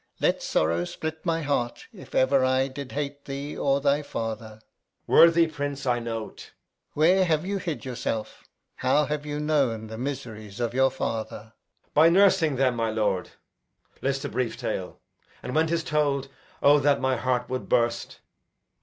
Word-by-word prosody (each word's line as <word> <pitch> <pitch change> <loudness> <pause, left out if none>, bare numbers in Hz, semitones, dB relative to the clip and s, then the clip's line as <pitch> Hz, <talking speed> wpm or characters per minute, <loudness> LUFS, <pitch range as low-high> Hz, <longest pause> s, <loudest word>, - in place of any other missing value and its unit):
Let - - +1
sorrow 85 +2 +1
split 160 - -6
my 165 -1 0
heart 130 -5 -2
if - - -12
ever 130 0 +4
I 130 +1 +2
Did 135 0 -8
hate 145 0 -4
thee, 140 +1 -5
or 140 0 +1
thy 140 +1 +2
father! 110 -5 -5
Edg. - - -26 0.4
Worthy 170 0 +6
prince, 145 -3 -4
I 120 -2 +2
know't. 115 -2 -5
Alb. - - -13 0.4
Where 180 +5 +4
have 160 -2 +1
you 200 +1 -2
hid 165 -6 -4
yourself? 120 -4 -4 0.3
How 145 +4 +2
have 150 0 -3
you 145 0 -3
known 140 -8 +1
the 110 +1 -8
miseries 110 -6 -6
of 120 -1 -1
your 135 +1 +4
father? 110 -3 -5 0.4
Edg. - - -46
By 155 +2 +6
nursing 185 -5 +4
them, 130 -2 +1
my 115 -1 0
lord. 105 -4 -1 0.7
List 135 +1 -1
a - - -3
brief 125 -3 -2
tale; 95 -4 -4 0.4
And 125 - -5
when 160 +1 +3
'tis 165 0 0
told, 140 -3 0 0.3
O 145 +1 +7
that 140 0 +3
my 130 0 +1
heart 125 -1 -1
would 130 0 -4
burst! 120 -1 0
135 Hz, 170 wpm, -26 LUFS, 120-150 Hz, 0.7 s, O